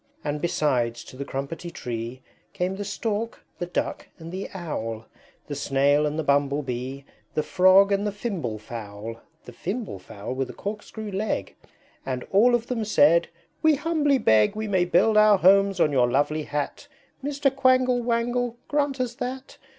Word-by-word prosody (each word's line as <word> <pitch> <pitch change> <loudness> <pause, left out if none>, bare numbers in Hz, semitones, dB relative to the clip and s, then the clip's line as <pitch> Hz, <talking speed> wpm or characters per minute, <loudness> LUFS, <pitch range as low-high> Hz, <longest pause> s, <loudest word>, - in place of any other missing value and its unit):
IV. - - -42 0.2
And 150 0 -2
besides, 125 -8 0
to - - -13
the 140 - -4
Crumpetty 140 +6 -5
Tree 120 -2 -6 0.3
Came 190 -1 -1
the 205 - -3
Stork, 215 +2 -3
the 175 - -3
Duck, 175 - -3
and 165 0 -9
the 190 +2 -5
Owl; 115 - -5 0.4
The 145 - -6
Snail 140 +1 +2
and 150 +1 -3
the 160 - -1
Bumble 140 0 +2
Bee, 130 +2 -5 0.3
The 155 - +1
Frog 190 +2 +5
and 200 +1 +1
the - - -1
Fimble 190 - -3
Fowl 110 0 -8 0.2
(The - - -9
Fimble 200 - -4
Fowl, 100 +5 -7
with 130 -1 -2
a - - -7
Corkscrew 210 +1 -6
leg); 195 - -2 0.5
And 130 -1 -3
all 235 +5 +5
of 235 -1 -1
them 240 -2 -2
said, 170 -4 +4 0.3
"We 315 -1 +5
humbly 295 -2 +2
beg 110 - +4
We 215 0 -3
may 190 -3 +2
build 210 +5 +3
our 215 -1 +7
homes 195 +1 +4
on 150 - +4
your 125 -3 +3
lovely 145 +4 +1
Hat, 145 - -4 0.4
Mr. 280 -1 0
Quangle 255 -2 +3
Wangle, 240 0 0
grant 285 -2 0
us 250 -2 -1
that! 255 +2 -6
180 Hz, 175 wpm, -25 LUFS, 135-225 Hz, 0.5 s, our